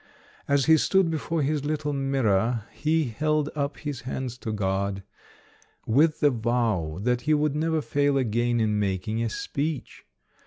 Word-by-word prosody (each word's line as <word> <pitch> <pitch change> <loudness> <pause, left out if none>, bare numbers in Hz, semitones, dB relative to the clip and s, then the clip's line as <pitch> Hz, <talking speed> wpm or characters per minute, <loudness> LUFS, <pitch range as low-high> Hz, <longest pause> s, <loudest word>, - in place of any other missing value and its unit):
As 140 -2 +2
he 160 0 +6
stood 190 +1 +2
before 160 0 -1
his 145 0 0
little 150 0 -2
mirror, 120 -5 +1
he 160 +1 +1
held 150 +4 0
up 140 -1 -2
his 145 -5 -5
hands 125 0 -4
to 115 - -4
God, 100 -1 -1 0.8
with 150 +7 +3
the 145 - +5
vow 110 -9 0
that 125 +1 +1
he 155 - +5
would 150 -1 +1
never 160 0 0
fail 145 -1 +1
again 120 -1 +1
in 105 -2 +1
making 100 +3 -1
a 115 - 0
speech. 145 +5 -4
135 Hz, 155 wpm, -26 LUFS, 110-150 Hz, 0.8 s, he